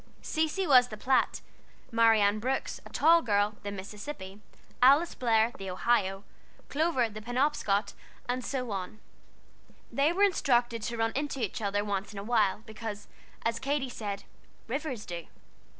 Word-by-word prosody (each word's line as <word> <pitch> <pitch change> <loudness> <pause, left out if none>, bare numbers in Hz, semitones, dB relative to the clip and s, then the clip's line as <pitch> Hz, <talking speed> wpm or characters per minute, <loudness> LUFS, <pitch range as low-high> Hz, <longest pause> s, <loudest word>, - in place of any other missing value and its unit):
Cecy 320 +5 0
was 255 -5 +6
the 215 - -8
Platte, 260 +4 +1 0.5
Marianne 220 -3 +4
Brooks, 260 +4 -2
a - - -14
tall 330 +3 +5
girl, 210 -3 +1
the 205 - -5
Mississippi, 200 0 -8 0.4
Alice 285 +7 +6
Blair, 230 -2 +2
the 195 -1 -5
Ohio, 195 0 +1 0.5
Clover, 300 -5 +1
the 215 0 -9
Penobscot, 245 -4 0 0.3
and 250 +1 -1
so 250 -3 -3
on. 195 +2 -5 0.9
They 280 +3 +3
were 385 +4 +2
instructed 240 - +2
to 235 +2 -3
run 225 0 +1
into 285 0 -2
each 225 -2 -2
other 205 0 0
once 200 0 -3
in - - -9
a 200 - -4
while, 215 -2 +1
because, 215 -1 -7 0.4
as 230 0 0
Katy 275 0 -1
said, 205 -4 -5 0.4
"rivers 260 -3 -3
do." 170 -1 -6
230 Hz, 150 wpm, -29 LUFS, 205-270 Hz, 0.9 s, was